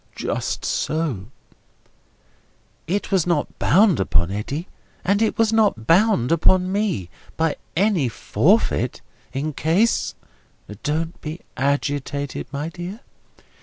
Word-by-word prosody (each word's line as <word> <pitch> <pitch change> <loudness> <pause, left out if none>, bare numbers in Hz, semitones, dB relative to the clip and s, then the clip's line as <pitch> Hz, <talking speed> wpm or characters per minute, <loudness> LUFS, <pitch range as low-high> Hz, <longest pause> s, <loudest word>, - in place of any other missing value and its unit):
"Just - - -3
so." 150 - -1 1.6
"It 200 +5 -1
was 185 -4 +2
not 170 -4 -1
bound 195 - +4
upon 85 -2 +1
Eddy, 140 - -4 0.4
and 200 +3 +2
it 220 - +1
was 225 -1 +3
not 205 - +2
bound 170 - +4
upon 185 +3 +3
me, 195 - -1 0.3
by 160 -1 +1 0.2
any 180 - +2
forfeit, 115 - +1 0.3
in 145 +3 -2
case—" 175 +11 +1 0.7
"Don't 160 +3 -2
be 155 +3 -6
agitated, 140 +1 -1
my 145 +3 -3
dear. 180 +6 -7
165 Hz, 110 wpm, -22 LUFS, 140-195 Hz, 1.6 s, bound